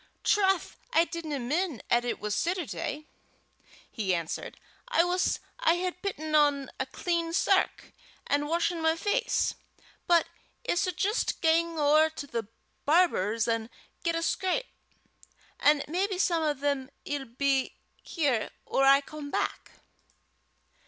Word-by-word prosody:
"Troth, 385 -3 +2
I 340 -8 +4
didna 325 -4 -4
min' 290 - -1
'at 240 0 +4
it 245 - -2
was 210 0 -2
Setterday," 305 - -2 0.9
he 195 -5 0
answered. 165 -1 -5 0.3
"I 340 -9 +3
wuss 360 +1 +1 0.2
I 425 -9 +4
had 360 0 -3
pitten 315 -6 -4
on 290 -3 +3
a 265 - -1
clean 335 +3 -2
sark, 385 +2 +1 0.3
an' 290 +1 0
washen 335 +1 0
my 320 0 +3
face. 425 +8 0 0.5
But 345 -2 +5 0.4
I - - +2
s' 345 - +1
jist 415 +7 0
gang 330 0 +2
ower 305 +1 +5
to 315 -2 -7
the 230 -6 -4 0.4
barber's 230 - +2
an' 230 -1 -1 0.3
get 335 -1 +1
a 330 - -1
scrape, 380 +9 0 0.9
an' 295 0 +4
maybe 375 +5 -1
some 345 -3 +2
o' 300 -2 +1
them 280 -1 -1 0.2
'ill 285 -2 -3
be 265 +2 0 0.3
here 280 -9 0 0.2
or 270 - +1
I 275 +1 +7
come 295 0 -8
back." - - -3
310 Hz, 140 wpm, -28 LUFS, 275-350 Hz, 0.9 s, I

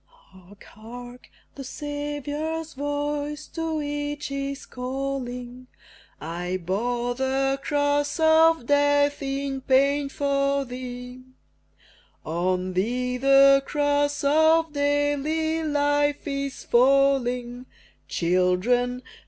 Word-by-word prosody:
Hark! 205 - -19
hark! 245 +3 -12 0.2
the 275 - -8
Saviour's 295 +3 -4
voice 290 +1 -3
to 325 -2 -3
each 290 0 -4
is 275 0 -4
calling 250 -1 -5 0.5
"I 175 +4 -4
bore 240 +7 -2
the 270 +1 0
Cross 290 +1 0
of 320 -3 +4
Death 285 +1 +2
in 275 0 -3
pain 275 +2 +2
for 275 0 0
thee; 250 0 -8 1.0
On 180 +3 -1
thee 250 +6 -1
the 275 +1 +6
Cross 290 0 0
of 315 +2 +3
daily 290 +3 0
life 290 -1 0
is 275 -1 -4
falling: 250 -1 +2 0.4
Children! 185 +9 +1
275 Hz, 90 wpm, -25 LUFS, 245-290 Hz, 1.0 s, the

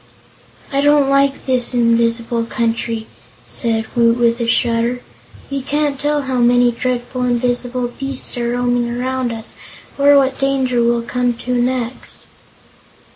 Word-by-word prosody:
"I 275 - +2
don't 290 -1 +4
like 275 0 +2
this 255 -1 +1
invisible 230 0 +1
country," 230 -1 -2 0.4
said 225 -2 -1
Woot 235 -1 +4
with 235 0 +2
a 235 - -1
shudder. 235 +1 +1 0.5
"We 275 0 -2
can't 285 +1 -1
tell 295 0 0
how 260 -2 -1
many 245 0 +4
dreadful, 250 +1 -3
invisible 245 0 0
beasts 270 +2 -3
are 235 0 -1
roaming 245 0 0
around 250 +1 -2
us, 225 0 -5 0.5
or 285 0 +6
what 265 -1 +1
danger 265 -3 +1
we'll 235 0 +1
come 245 0 -1
to 250 +2 -4
next." 245 0 -2
245 Hz, 135 wpm, -18 LUFS, 235-265 Hz, 0.5 s, or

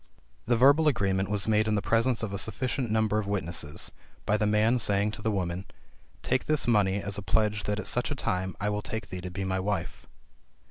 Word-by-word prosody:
The 120 0 +3
verbal 140 +6 +5
agreement 95 -8 +1
was 105 -1 0
made 110 0 +3
in 110 - +1
the - - +2
presence 115 +1 +2
of 100 -3 -3
a 100 - -2
sufficient 125 +3 -2
number 110 -1 +1
of 105 - -4
witnesses, 85 -6 -3 0.3
by 105 - +2
the 105 -1 +1
man 110 +4 +3
saying 100 -1 +1
to 105 - -8
the 110 - 0
women, 90 -3 -2 0.6
"Take 130 - 0
this 155 -1 +1
money 105 -5 +3
as 100 +1 -1
a - - -5
pledge 105 +1 0
that 105 0 -1
at 105 - -4
such 120 - +1
a 145 - -2
time 95 -6 -2
I 105 - -1
will 105 0 -1
take 110 +1 -5
thee 90 - -5
to 90 - -5
be 95 +2 -4
my 95 0 -1
wife." 95 -3 -3
105 Hz, 225 wpm, -28 LUFS, 95-110 Hz, 0.6 s, verbal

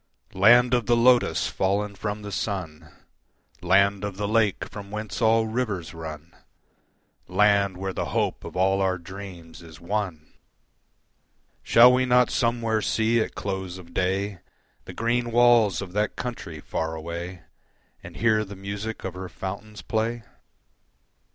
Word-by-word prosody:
Land 120 +6 +5
of 120 -3 +1
the 120 - +4
Lotus 120 +1 +4
fallen 100 +2 -1
from 105 +1 -5
the 100 - -6
sun, 85 -5 -4 0.7
Land 100 0 +3
of 100 -2 -4
the 105 0 -2
Lake 110 -2 +1
from 100 -1 -9
whence 105 +2 -5
all 115 0 +4
rivers 110 -7 -3
run, 80 0 -9 0.9
Land 100 0 +3
where 95 0 -4
the - - -2
hope - - -1
of - - -9
all 95 +1 +2
our 95 -1 +1
dreams 90 -2 -10
is 80 -3 -13
won! 90 -4 -4 1.3
Shall 120 +2 +7
we 130 0 +2
not 125 0 +4
somewhere 115 -3 0
see 115 +2 +1
at - - -4
close 95 -2 -4
of 85 -2 -13
day 95 +2 -1 0.5
The - - -9
green 120 +1 0
walls 120 -4 +4
of 90 -2 -10
that 105 +1 0
country 115 -10 -6
far 80 +2 -3
away, 85 +2 -6 0.6
And - - -11
hear 110 -2 +2
the 100 -1 -9
music 100 +3 -6
of 95 - -4
her 90 0 -7
fountains 100 +3 -7
play? 115 +1 -2
100 Hz, 145 wpm, -25 LUFS, 95-110 Hz, 1.3 s, Shall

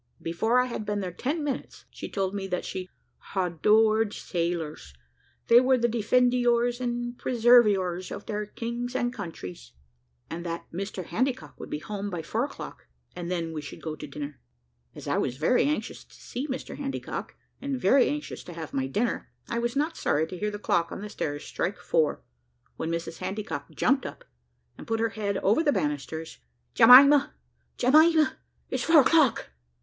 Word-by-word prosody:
Before 220 +9 +1
I 250 - +3
had 235 -3 -4
been 210 -1 -2
there 185 -2 -3
ten 290 - -2
minutes, 280 -3 -5
she - - -7
told 195 -1 -2
me 195 -1 -3
that 180 -1 -3
she 185 -1 -5 0.5
"hadored 210 +4 +3
sailors 165 - -3 0.5
they 235 +1 +7
were 260 0 +4
the 240 0 +2
defendiours 245 +1 +2
and 240 0 -2
preserviours 210 -7 +4
of 205 - -7
their 210 -1 -3
kings 240 +3 -5
and 245 -1 0
countries," 90 - -8 0.5
and 170 +1 -6
that 170 -1 -4
Mr 190 0 -4
Handycock 255 +9 -2
would - - -8
be - - -2
home 205 +5 -5
by 175 -4 -4
four - - -1
o'clock, - - -9 0.3
and 175 -1 -5
then 170 -2 -2
we 155 - -4
should 145 - -9
go 155 -2 -4
to - - -8
dinner. 145 -1 -7 0.6
As - - -9
I - - +1
was 125 - -2
very 165 - +3
anxious 300 +1 -2
to - - -21
see 260 +5 -6
Mr 265 -2 -5
Handycock, 275 -1 -5 0.3
and 275 -2 -2
very 250 +5 +4
anxious 295 0 -5
to 175 - -8
have 160 -2 -7
my 135 -1 0
dinner, 215 - -1 0.2
I 235 - -2
was 235 +1 -2
not 305 +4 0
sorry 150 +2 +1
to 185 - -6
hear 210 - 0
the 205 - -5
clock 175 -4 0
on - - -6
the 210 - -6
stairs 145 -6 -4
strike - - -2
four; - - 0 0.5
when 160 - -3
Mrs 170 0 -4
Handycock 210 +3 -4
jumped 270 +2 +2
up, - - -11 0.5
and - - -10
put 225 0 0
her 230 0 +1
head 200 -2 -2
over 210 +10 +4
the 300 -3 +3
banisters. 150 - -3 0.3
"Jemima, 270 +5 +8 0.4
Jemima, 310 +4 +4 0.3
it's - - -1
four 325 -2 +7
o'clock!" 285 - +3
215 Hz, 175 wpm, -27 LUFS, 175-250 Hz, 0.6 s, Jemima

